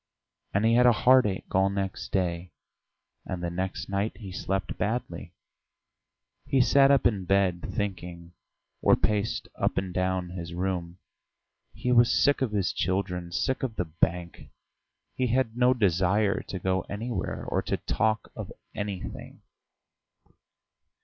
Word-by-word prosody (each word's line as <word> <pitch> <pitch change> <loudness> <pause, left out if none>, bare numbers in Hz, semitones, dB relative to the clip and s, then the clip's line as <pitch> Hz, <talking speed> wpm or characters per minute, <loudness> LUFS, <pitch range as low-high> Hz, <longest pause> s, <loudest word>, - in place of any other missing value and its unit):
And 100 +3 +1
he 115 - +4
had 125 +1 +6
a 120 - +7
headache 115 -3 +3
all 95 +1 +4
next 100 -1 -4
day. 90 -2 -1 0.7
And 90 -2 -5
the 85 - -2
next 95 +2 -3
night 100 +2 -2
he 100 -5 -8
slept 95 +1 -2
badly; 90 -6 -3 1.1
he 135 - +2
sat 135 +2 +5
up 140 -2 +4
in 100 -6 +2
bed, 95 -2 +2
thinking, 90 -4 -4 0.5
or - - +5
paced 105 0 -1
up - - -1
and 95 -1 -2
down 90 -1 -1
his 85 -1 -6
room. 90 -1 -2 0.7
He 125 - -2
was 120 -1 +5
sick 145 -1 +3
of 130 -5 0
his 100 -3 0
children, 90 -2 -2
sick 130 +9 -1
of 125 -4 -3
the 90 - -1
bank; 85 +2 -2 0.6
he 130 - 0
had 120 -1 +1
no 125 +1 +4
desire 100 -2 +2
to 95 - -4
go 95 0 0
anywhere 115 +4 -4
or - - 0
to - - -2
talk 110 0 -1
of - - -7 0.2
anything. 100 -3 -6
95 Hz, 145 wpm, -27 LUFS, 90-115 Hz, 1.1 s, a